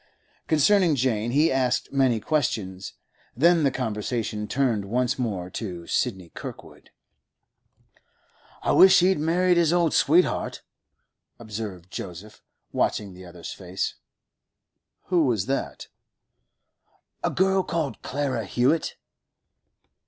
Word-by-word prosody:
Concerning 165 +2 +4
Jane 120 -4 0
he 150 +6 +3
asked 130 0 0
many 130 -4 +2
questions; 105 -10 -2 0.4
then 170 +4 +5
the 140 - +3
conversation 110 -3 -3
turned 120 -6 0
once 125 +5 -1
more 100 -8 -2
to 90 -5 -6
Sidney 95 -7 -2
Kirkwood. - - -10 1.7
'I - - +1
wish 190 +1 +7
he'd 185 -2 +3
married 175 +3 +2
his 165 -2 +3
old 170 -2 +2
sweetheart,' 170 +5 +2 0.7
observed 105 -5 -7
Joseph, 95 +4 -8 0.3
watching 100 -3 -1
the 90 0 -12
other's 85 -1 -8
face. 95 0 -4 1.2
'Who 175 -4 +3
was 110 -7 0
that?' 135 +1 -3 1.4
'A - - +2
girl 190 0 +2
called 160 -9 -3
Clara 130 -5 -2
Hewett. 135 - +1
125 Hz, 110 wpm, -25 LUFS, 105-155 Hz, 1.7 s, wish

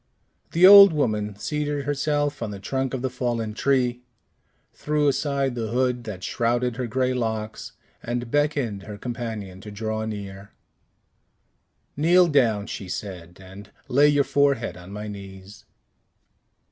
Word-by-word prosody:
The 170 +2 +6
old 200 -2 +10
woman 105 -8 -1
seated 145 +4 -3
herself 145 0 -1
on 115 - -3
the 100 -1 -7
trunk 135 +5 -2
of 130 - -5
the 130 - 0
fallen 120 -3 -2
tree, 125 0 0 0.7
threw 150 0 0
aside 140 -2 0
the 115 -2 -3
hood 125 +1 -1
that 95 -4 -7
shrouded 120 +1 0
her 125 -2 -2
gray 130 +2 0
locks, 110 -3 -4 0.3
and 120 0 -4
beckoned 145 -9 0
her 105 +1 -9
companion 110 -5 -6
to 105 - -9
draw 110 +1 -3
near. 100 -2 -7 1.4
"Kneel 175 +4 +4
down," 115 -8 +2
she 95 -3 -7
said, 90 -3 -7
"and 95 +2 -12 0.2
lay 140 +4 +4
your 145 -1 +3
forehead 140 -4 +1
on 90 +1 -12
my 105 +1 -6
knees." 100 -1 -11
120 Hz, 140 wpm, -24 LUFS, 105-140 Hz, 1.4 s, old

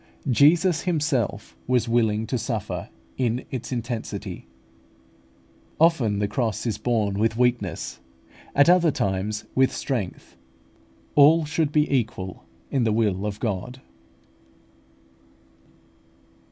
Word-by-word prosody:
Jesus 160 +6 +4
Himself 145 - -1
was 125 -2 +2
willing 110 -2 +1
to 125 +2 -2
suffer 105 -8 -4 0.3
it - - +1
in 120 +1 -1
its 125 -1 -5
intensity. 110 - -5 1.3
Often 145 -11 +3
the 105 0 0
cross 110 0 -2
is 110 -3 -2
borne 105 -4 0
with 110 +1 +1
weakness, 120 -7 -1 0.6
at 140 +2 +5
other 175 -1 +5
times 100 -3 -2
with 130 0 +3
strength: 115 -10 -4 0.8
all 155 +3 +6
should 155 -1 0
be 150 0 +3
equal 105 -7 -3 0.3
in 135 -3 +1
the 110 - +2
will 105 -2 0
of 105 0 -5
God. 120 +3 -3
120 Hz, 115 wpm, -24 LUFS, 105-140 Hz, 1.3 s, all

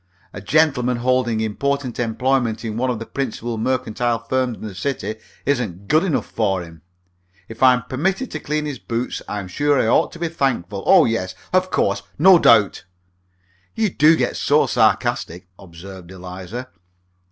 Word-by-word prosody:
A 105 - -7
gentleman 125 0 +2
holding 120 -2 +1
important 130 +4 -2
employment 120 -1 0
in 110 -1 -4
one 130 +3 0
of 125 - -1
the 115 - -7
principal 120 -4 -4
mercantile 120 -1 -1
firms 125 +1 -2
in - - -12
the 105 - -8
city 110 0 -3 0.3
isn't 110 -9 -2
good 155 +2 +3
enough 175 -7 0
for 95 -5 -1
him. 80 -2 -13 0.7
If 115 - -11
I'm 125 -2 +5
permitted 190 - -2
to 155 - -4
clean 150 +1 -2
his 145 -5 -5
boots 115 +6 -3
I'm 105 -2 -4
sure 145 +9 +1
I - - +2
ought 115 - +2
to - - -9
be 170 0 -2
thankful. 115 - -2
Oh, - - +7
yes! 95 -5 -2 0.2
Of 185 0 +2
course! 100 - 0 0.2
No 180 +3 +7
doubt!" 110 - +4 0.9
"You 220 -3 0
do 155 +1 +5
get - - -1
so - - +3
sarcastic," 90 +2 0
observed 95 0 -12
Eliza. 95 +7 -8
120 Hz, 165 wpm, -20 LUFS, 105-140 Hz, 0.9 s, Oh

